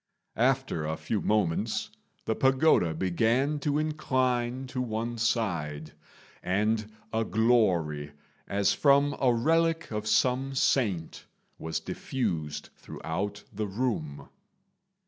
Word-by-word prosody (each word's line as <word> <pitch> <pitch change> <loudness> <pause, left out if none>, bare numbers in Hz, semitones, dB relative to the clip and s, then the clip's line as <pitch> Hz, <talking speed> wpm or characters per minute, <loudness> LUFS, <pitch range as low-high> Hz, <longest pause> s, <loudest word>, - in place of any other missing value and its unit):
After 130 -9 +1
a 80 +1 -2
few 110 - -2
moments 105 +1 0 0.3
the 110 - +1
pagoda 130 - +3
began 115 - +1
to 145 0 0
incline 130 -5 0
to 130 0 -4
one 115 0 -3
side, 85 -10 -1 0.5
and 105 +3 0 0.2
a 110 0 +1
glory, 90 -11 +1 0.3
as 100 0 +2
from 140 0 +4
a 130 -2 +4
relic 165 +6 +1
of 105 0 -3
some 130 +4 +2
saint, 105 -11 0 0.3
was 80 0 -3
diffused 85 - -3
throughout 100 +5 -5
the 105 +1 -2
room. 95 - -3
115 Hz, 105 wpm, -28 LUFS, 95-130 Hz, 0.5 s, from